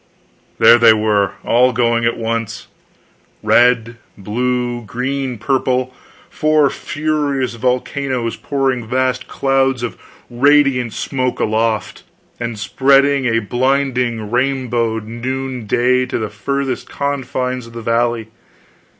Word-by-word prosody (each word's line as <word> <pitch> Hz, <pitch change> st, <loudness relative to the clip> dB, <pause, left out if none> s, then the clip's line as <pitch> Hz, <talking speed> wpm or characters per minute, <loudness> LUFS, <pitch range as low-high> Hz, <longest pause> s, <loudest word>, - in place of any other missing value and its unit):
There 115 Hz, +1 st, +7 dB
they 115 Hz, -1 st, +7 dB
were, 105 Hz, -3 st, +1 dB
all 125 Hz, +2 st, +3 dB
going 115 Hz, -1 st, +1 dB
at 115 Hz, -, 0 dB
once, 115 Hz, -1 st, -3 dB, 0.8 s
red, 120 Hz, -1 st, +3 dB, 0.2 s
blue, 120 Hz, +4 st, -2 dB
green, 125 Hz, +2 st, -3 dB
purple! 130 Hz, +1 st, 0 dB, 0.3 s
four 155 Hz, -2 st, +2 dB
furious 145 Hz, -4 st, -2 dB
volcanoes 125 Hz, 0 st, -2 dB
pouring 135 Hz, -4 st, -2 dB
vast 130 Hz, +1 st, -1 dB
clouds 135 Hz, -2 st, 0 dB
of 115 Hz, -5 st, -5 dB, 0.3 s
radiant 130 Hz, -2 st, +3 dB
smoke 130 Hz, -2 st, -2 dB
aloft, 110 Hz, -1 st, -1 dB, 0.4 s
and 115 Hz, -2 st, -4 dB
spreading 135 Hz, +6 st, +3 dB
a 115 Hz, -1 st, +1 dB
blinding 125 Hz, -3 st, 0 dB
rainbowed 120 Hz, -4 st, 0 dB
noonday 125 Hz, +1 st, -1 dB
to -, -, -2 dB
the 110 Hz, -2 st, -3 dB
furthest 135 Hz, +5 st, -3 dB
confines 130 Hz, -3 st, -3 dB
of 115 Hz, -, -14 dB
that 115 Hz, -1 st, -7 dB
valley. 115 Hz, -1 st, 0 dB
125 Hz, 105 wpm, -17 LUFS, 115-135 Hz, 0.8 s, There